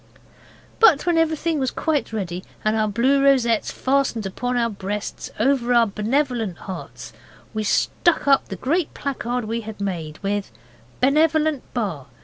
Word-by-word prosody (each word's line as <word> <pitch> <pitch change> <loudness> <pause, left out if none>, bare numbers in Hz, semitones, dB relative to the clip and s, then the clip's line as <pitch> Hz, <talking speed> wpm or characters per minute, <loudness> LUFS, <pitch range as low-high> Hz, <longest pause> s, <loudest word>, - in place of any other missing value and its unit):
But 450 -11 +6
when 345 -1 +2
everything 320 0 0
was 260 -1 +1
quite 305 -3 -1
ready, 185 -4 -4 0.2
and 215 +1 +2
our 215 -1 +1
blue 255 +7 +2
rosettes 245 -5 +3
fastened 260 -6 0
on 245 0 0
our 235 -1 +2
breasts 205 -1 -5
over 245 0 +2
our 235 -1 +6
benevolent 225 - -1
hearts, 190 - -8 0.4
we 215 -1 -2
stuck 315 - +1
up 275 -1 +4
the 195 - -5
great 305 - -1
placard 250 -4 -3
we 230 +2 -2
had 220 -1 -9
made 170 -6 -4
with 200 0 -2 0.5
'Benevolent 305 +1 +2
Bar. 190 - -2
240 Hz, 145 wpm, -22 LUFS, 210-280 Hz, 0.5 s, But